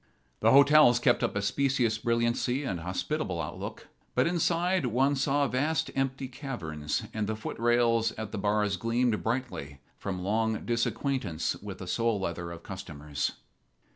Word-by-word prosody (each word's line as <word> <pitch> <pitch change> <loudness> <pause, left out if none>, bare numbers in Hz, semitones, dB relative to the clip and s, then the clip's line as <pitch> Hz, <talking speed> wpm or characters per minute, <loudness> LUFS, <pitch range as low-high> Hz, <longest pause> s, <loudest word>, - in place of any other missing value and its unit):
The - - +4
hotels 140 -2 +7
kept 120 0 +3
up - - 0
a 100 - 0
specious 120 0 +1
brilliancy 120 +3 +1
and 95 -10 -2
hospitable 90 - -2
outlook, - - -6 0.3
but - - +4
inside 175 -1 +1
one 135 +5 +2
saw 140 +1 +2
vast 145 +4 0
empty 135 0 -1
caverns, 95 - -4
and 110 -2 -1
the 110 - -1
footrails 115 0 +1
at 110 -1 -5
the - - -4
bars 105 -1 +1
gleamed 115 +2 +1
brightly 110 - -3 0.2
from 95 -2 -4
long 110 +2 0
disacquaintance 115 - -1
with 100 -2 -7
the 90 - -7
sole 115 +3 0
leather 85 -2 -3
of 85 0 -9
customers. 75 -7 -4
115 Hz, 145 wpm, -29 LUFS, 95-135 Hz, 0.3 s, hotels